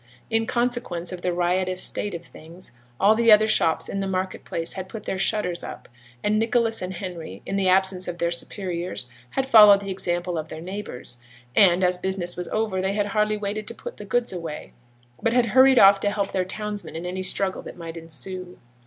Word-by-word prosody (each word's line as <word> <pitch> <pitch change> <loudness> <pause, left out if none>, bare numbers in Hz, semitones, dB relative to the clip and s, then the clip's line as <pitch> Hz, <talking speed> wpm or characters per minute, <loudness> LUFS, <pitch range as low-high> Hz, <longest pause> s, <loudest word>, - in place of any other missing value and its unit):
In 225 0 +1
consequence 240 -8 -1
of 180 -1 -7
the 180 - 0
riotous 180 +1 0
state 205 0 -3
of 170 0 -8
things, 170 +4 -11 0.3
all 200 +2 +6
the 230 0 +4
other 215 +1 +7
shops 165 -7 +2
in 195 - -3
the 195 - -2
market 185 0 -3
place 165 0 -1
had 190 -1 -6
put 215 0 -7
their 190 - -3
shutters 195 -3 -1
up; - - -8 0.4
and 210 +1 +2
Nicholas 225 0 +1
and 185 +1 -4
Henry, 170 - -7
in 195 - -3
the 195 -1 +2
absence 190 0 +2
of 175 -1 -4
their 170 -1 0
superiors, 175 -5 -4 0.2
had 265 - -1
followed 210 -5 +8
the 200 -1 -5
example 175 -2 -1
of 155 - -5
their 155 - -7
neighbours, 175 -9 -7 0.4
and, 185 -2 +5
as 180 0 +2
business 185 -1 -1
was 180 0 -3
over, 215 -4 -1
they 190 +1 0
had 205 0 0
hardly 210 +1 0
waited 210 +1 -4
to 230 - -7
put - - -8
the 210 - -9
goods 240 +1 0
away, 165 -4 -7 0.5
but 230 - +1
had 245 -1 +4
hurried 260 +3 +5
off 195 -1 +8
to 205 - +1
help 200 -1 -2
their 185 -1 0
townsmen 210 0 -5
in 165 +2 -5
any 185 +1 -3
struggle 190 0 0
that - - -10
might 165 -1 -7
ensue. 175 +3 -6
190 Hz, 210 wpm, -24 LUFS, 175-210 Hz, 0.5 s, followed